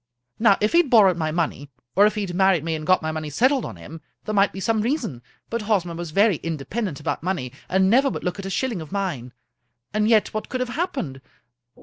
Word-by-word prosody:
Now, 215 -3 +5
if 210 - +2
he 340 - +5
had 335 -6 +2
borrowed 205 -7 +6
my 160 -2 -1
money, 155 -3 -2 0.3
or 205 +2 +6
if 215 - -2
he 210 - -1
had 190 -3 -4
married 190 -3 +3
me 165 0 -2
and 155 -1 -5
got 185 -2 +4
my 160 - -1
money 155 -1 -4
settled 255 - +2
on - - -7
him, 155 - -11 0.2
there 215 - -3
might 200 -1 +3
be 195 - -8
some 220 +2 +1
reason; 230 - -2 0.3
but 230 0 -3
Hosmer 200 -5 0
was 170 0 -5
very 200 +2 +3
independent 165 +3 -4
about 150 - -3
money, 165 -9 -2 0.2
and 190 0 +3
never 265 +7 +4
would - - -5
look 180 +2 -3
at 195 - -5
a - - -4
shilling 225 -1 -2
of 155 - -10
mine. 175 -12 -3 0.6
And 215 0 +1
yet 215 -3 +3
what 215 - -4
could 255 - -3
have 255 -1 -2
happened? 260 - -3
195 Hz, 240 wpm, -23 LUFS, 160-220 Hz, 0.6 s, borrowed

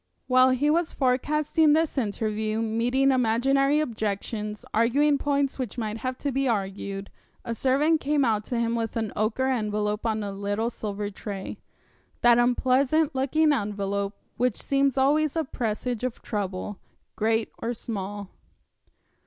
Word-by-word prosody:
While 255 0 +5
he 270 +4 +2
was 335 +1 +1
forecasting 295 +4 +2
this 320 0 +1
interview, 215 -2 -1
meeting 245 +5 +2
imaginary 270 +4 +2
objections, 215 -3 -3
arguing 280 +6 +3
points 280 -1 0
which 250 -2 -4
might 220 -2 -3
have 255 +2 -3
to 280 - +1
be 270 +1 0
argued, 195 -2 -3 0.3
a 235 - -2
servant 285 +6 +2
came 285 0 +2
out 215 -2 +1
to 240 - -2
him 230 0 0
with 225 -1 -2
an 220 -3 -2
ochre 220 +5 0
envelope 210 -2 -1
on 215 -1 -1
a 200 - -4
little 205 +4 -2
silver 205 -2 -4
tray 195 -1 -6 0.6
that 240 0 +6
unpleasant 260 +5 +2
looking 295 +4 +2
envelope 200 -3 -2 0.2
which 245 -2 +1
seems 275 -1 +1
always 295 +3 +2
a 325 - +1
presage 240 -2 -3
of 255 -2 -3
trouble, 195 -1 -4 0.4
great 225 +1 0
or 230 - -2
small. 205 -4 -5
235 Hz, 145 wpm, -26 LUFS, 210-275 Hz, 0.6 s, that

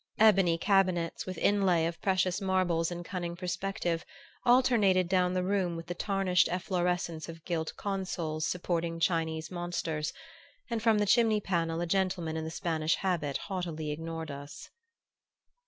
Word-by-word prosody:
Ebony 195 -6 +5
cabinets, 185 -3 +1
with 185 -2 -5
inlay 185 -5 +3
of 170 0 -4
precious 185 0 +1
marbles 185 -4 +1
in 175 0 -5
cunning 175 -1 -4
perspective, 180 -1 -2 0.4
alternated 225 -8 +4
down 180 0 +2
the 180 - +1
room 185 -2 0
with 165 0 -6
the 175 - -4
tarnished 190 -1 +2
efflorescence 175 -2 -1
of 165 -1 -10
gilt 160 -3 -2
consoles 180 -6 -3
supporting 170 -2 -2
Chinese 160 -1 0
monsters; 175 -3 -2 0.6
and 230 -1 -1
from 225 -1 +4
the 210 - +2
chimney 220 0 +4
panel 170 -4 -1
a - - 0
gentleman 180 -3 0
in 160 - -2
the 160 - -4
Spanish 160 -2 0
habit 165 -7 -1
haughtily 170 -6 -4
ignored 160 0 -5
us. 140 +1 -9
175 Hz, 145 wpm, -30 LUFS, 165-190 Hz, 0.6 s, Ebony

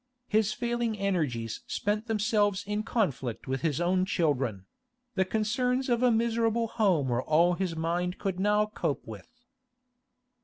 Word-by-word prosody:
His 215 -1 +2
failing 235 -1 -1
energies 150 - -1
spent 210 +2 -1
themselves 210 -3 +1
in 210 +1 -1
conflict 150 - -2
with 130 0 -2
his 155 -4 0
own 180 +1 +2
children; 135 - 0 0.5
the 190 - +2
concerns 250 +6 0
of 240 -1 +2
a 250 - +5
miserable 230 0 +1
home 185 - +2
were 120 0 +1
all 165 +5 +3
his 175 -2 -2
mind 175 +3 -1
could 190 -3 -3
now 210 +2 +3
cope 210 -9 -3
with. 110 -2 -10
200 Hz, 145 wpm, -29 LUFS, 165-220 Hz, 0.5 s, a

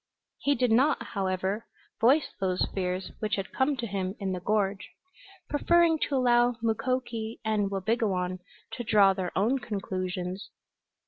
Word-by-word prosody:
He 285 0 +2
did 250 -3 +1
not, 270 +7 +4
however, 190 +2 -2 0.3
voice 270 +7 +3
those 185 -1 +1
fears 185 -1 -2
which 215 -1 0
had 195 -1 -5
come 270 +1 +1
to 240 - -3
him 195 -2 -3
in 195 -2 -2
the 185 - -2
gorge, 200 +1 -1 0.6
preferring 335 +2 +3
to 285 - 0
allow 245 -1 +4
Mukoki 230 0 -2
and 210 -2 +1
Wabigoon 190 -3 -1 0.3
to 240 - -5
draw 205 -3 +5
their 185 -2 -3
own 235 +8 +2
conclusions. 185 -3 -4
215 Hz, 140 wpm, -28 LUFS, 190-245 Hz, 0.6 s, draw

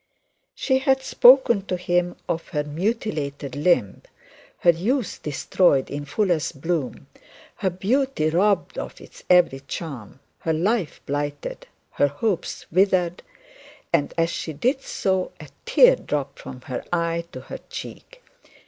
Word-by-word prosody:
She 260 -2 +1
had 265 -1 +2
spoken 250 -4 +6
to 180 - -1
him 175 0 0
of 165 - -2
her 150 -4 -2
mutilated 150 - -3
limb, 145 - +1 0.6
her 175 - +7
youth 215 - -2
destroyed 145 0 +1
in 145 0 -4
the - - -17
fullest 170 -8 0
bloom, 165 -3 -2 0.5
her 190 - 0
beauty 200 - 0
robbed 195 +4 +1
of - - -7
its - - -15
every 180 -7 +5
charm, 135 - -7 0.2
her 160 - -1
life 185 +2 0
blighted, 145 0 -4 0.2
her 145 - +2
hopes 175 +7 -2
withered; 180 -1 +2 0.7
and 145 -4 +2
as 165 0 +2
she 160 - -4
did 250 - 0
so, 190 -7 -1
a - - -11 0.2
tear - - +6
dropped 140 -2 -4
from 130 -1 -9
her 125 -1 -5
eye 170 -1 0
to - - -8
her - - -8
cheek. - - -9
170 Hz, 140 wpm, -23 LUFS, 145-205 Hz, 0.7 s, her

